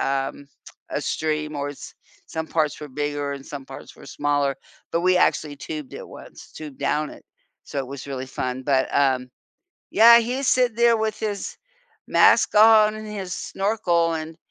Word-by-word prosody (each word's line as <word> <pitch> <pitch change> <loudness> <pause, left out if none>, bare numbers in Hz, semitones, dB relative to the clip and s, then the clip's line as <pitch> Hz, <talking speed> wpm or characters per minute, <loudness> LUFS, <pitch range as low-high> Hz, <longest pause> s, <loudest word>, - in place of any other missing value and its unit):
um, 135 +1 -2 0.4
a - - -2
stream 155 -1 -2
or 145 0 -3
it's 145 - -11 0.3
some 160 0 -4
parts 155 -3 0
were 150 - -7
bigger 145 +1 -3
and 140 -1 -8
some 140 -2 -8
parts 135 - -11
were - - -14
smaller, 145 -1 0 0.4
but 170 - +1
we 185 +1 +3
actually 150 -4 +1
tubed 150 -1 -7
it - - -8
once, - - -13
tubed 150 -3 -9
down 150 +2 -1
it, - - -14 0.4
so 140 - -5
it 135 - -2
was 140 +1 -8
really 130 -1 -4
fun, 130 0 -4
but, 135 -1 +1
um, 130 -2 +2 0.6
yeah, 235 +2 +8
he's 255 +4 -2
sit 250 -3 +2
there 235 -1 +4
with 220 -1 -2
his 205 -2 -4 0.5
mask - - +4
on 215 0 +6
and 215 0 -8
his 195 -4 -6
snorkel 180 -6 0
and 160 0 -6
155 Hz, 175 wpm, -23 LUFS, 140-210 Hz, 0.6 s, yeah